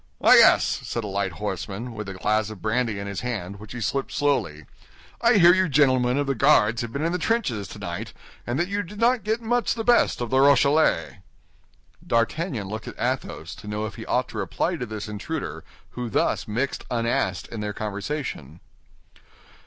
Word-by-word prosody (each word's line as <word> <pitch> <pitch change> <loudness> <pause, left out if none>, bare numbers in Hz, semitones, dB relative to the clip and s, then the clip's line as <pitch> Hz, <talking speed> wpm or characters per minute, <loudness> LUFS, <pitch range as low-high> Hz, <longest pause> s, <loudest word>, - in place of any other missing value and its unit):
"Ah, - - +4
yes," - - +6
said 115 - -4
a - - -4
light 100 -2 -2
horseman, 105 +4 -5
with 105 -3 -6
a 95 - -6
glass 110 +3 0
of 110 -3 -9
brandy 115 0 0
in 100 - -5
his 100 -1 -4
hand, 100 -5 -4
which 105 0 -11
he 120 - -6
sipped 135 +5 -2
slowly. 115 - 0 0.6
"I 235 +1 +5
hear 175 -4 +7
you 185 -1 +2
gentlemen 130 -3 +3
of 145 - +1
the 135 - 0
Guards 110 -1 +4
have 120 -1 -5
been 140 +5 -2
in 165 - +1
the 180 - -1
trenches 135 - -1
tonight, - - -6 0.4
and 120 +2 -1
that 175 +3 +1
you 200 +1 -1
did 205 +2 -10
not 240 -1 +3
get 220 +3 -1
much 240 +1 +1
the 225 - -3
best 240 +1 +3
of 120 -2 -4
the 130 - +3
Rochellais." 140 - +3 0.9
D'Artagnan 115 - 0
looked 110 +3 -6
at - - -8
Athos 120 -9 -3
to 105 - -12
know 105 +1 -2
if 110 - -6
he - - -9
ought - - +1
to - - -6
reply - - -1
to 125 - -5
this 110 -1 -6
intruder 110 +9 -5 0.3
who 125 -1 -5
thus - - 0
mixed 125 +6 -2
unasked 115 -1 -1
in 115 - -6
their 105 0 -3
conversation. 100 - -5
120 Hz, 195 wpm, -24 LUFS, 105-145 Hz, 0.9 s, hear